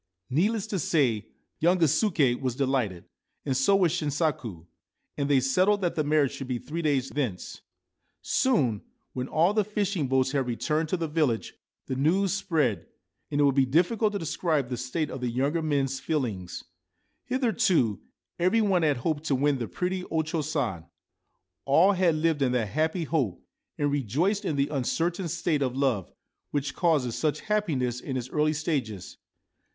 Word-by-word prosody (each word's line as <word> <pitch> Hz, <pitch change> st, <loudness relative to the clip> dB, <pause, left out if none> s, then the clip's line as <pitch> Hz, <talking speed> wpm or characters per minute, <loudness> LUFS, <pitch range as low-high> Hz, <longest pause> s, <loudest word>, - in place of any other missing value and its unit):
1 130 Hz, -, -2 dB
Needless 215 Hz, +1 st, +1 dB
to 205 Hz, -3 st, -3 dB
say, 125 Hz, -10 st, +1 dB, 0.3 s
young 175 Hz, +3 st, +3 dB
Gisuke 155 Hz, -, +2 dB
was 130 Hz, -3 st, -1 dB
delighted, 130 Hz, -10 st, -1 dB, 0.4 s
and 135 Hz, -3 st, 0 dB
so 135 Hz, +10 st, +4 dB
was 180 Hz, -4 st, +3 dB
Shinsaku; 145 Hz, -, -2 dB, 0.5 s
and 140 Hz, 0 st, -2 dB
they 140 Hz, -2 st, +5 dB
settled 185 Hz, +11 st, +2 dB
that 175 Hz, -2 st, 0 dB
the 155 Hz, -, 0 dB
marriage 150 Hz, -2 st, +2 dB
should 135 Hz, -, -7 dB
be 125 Hz, -1 st, -1 dB
three 160 Hz, +7 st, -5 dB
days 140 Hz, -4 st, +1 dB
thence. 125 Hz, -11 st, -4 dB, 0.6 s
Soon, 130 Hz, -, +1 dB, 0.3 s
when 125 Hz, 0 st, -3 dB
all 170 Hz, +7 st, +2 dB
the 215 Hz, 0 st, +2 dB
fishing 200 Hz, -6 st, -1 dB
boats 130 Hz, 0 st, +2 dB
had 135 Hz, -3 st, 0 dB
returned 150 Hz, +6 st, -1 dB
to 185 Hz, -, 0 dB
the 165 Hz, -1 st, -2 dB
village, 150 Hz, -7 st, 0 dB, 0.3 s
the -, -, -4 dB
news 170 Hz, +8 st, +2 dB
spread; 155 Hz, -, 0 dB, 0.4 s
and 145 Hz, -, -1 dB
it -, -, +5 dB
would 140 Hz, -1 st, +4 dB
be 135 Hz, -1 st, +3 dB
difficult 200 Hz, -, +2 dB
to -, -, 0 dB
des 165 Hz, -, -5 dB
cribe 155 Hz, -8 st, 0 dB
the 125 Hz, -, -2 dB
state 130 Hz, +6 st, -2 dB
of 130 Hz, -, -6 dB
the 125 Hz, -, -1 dB
younger 140 Hz, +7 st, 0 dB
men's 140 Hz, -4 st, 0 dB
feelings. 115 Hz, -, -3 dB, 0.6 s
Hitherto 225 Hz, -, +1 dB, 0.4 s
every 185 Hz, +6 st, +3 dB
one 190 Hz, -4 st, +2 dB
had 150 Hz, -4 st, +2 dB
hoped 150 Hz, +4 st, -2 dB
to 140 Hz, -, +1 dB
win 140 Hz, 0 st, +1 dB
the 120 Hz, -, -3 dB
pretty 185 Hz, 0 st, -2 dB
O 160 Hz, -1 st, 0 dB
Cho 160 Hz, +1 st, -2 dB
San; 130 Hz, -, -2 dB, 0.8 s
all 160 Hz, +8 st, +5 dB
had 180 Hz, -4 st, +2 dB
lived 155 Hz, -1 st, +1 dB
in 125 Hz, -2 st, +2 dB
that 115 Hz, -4 st, 0 dB
happy 160 Hz, -, 0 dB
hope, 135 Hz, -, -1 dB, 0.4 s
and 145 Hz, -1 st, 0 dB
rejoiced 155 Hz, -, 0 dB
in 160 Hz, -, -1 dB
the 140 Hz, 0 st, +1 dB
uncertain 165 Hz, +6 st, -1 dB
state 155 Hz, -1 st, -1 dB
of 130 Hz, -1 st, -1 dB
love, 130 Hz, -10 st, 0 dB, 0.4 s
which 145 Hz, -1 st, -2 dB
causes 150 Hz, -9 st, +1 dB
such 155 Hz, -1 st, -1 dB
happiness 150 Hz, -, -1 dB
in 130 Hz, 0 st, -4 dB
its 125 Hz, 0 st, -5 dB
early 155 Hz, 0 st, +2 dB
stages. 140 Hz, -, -3 dB
150 Hz, 175 wpm, -27 LUFS, 130-170 Hz, 0.8 s, they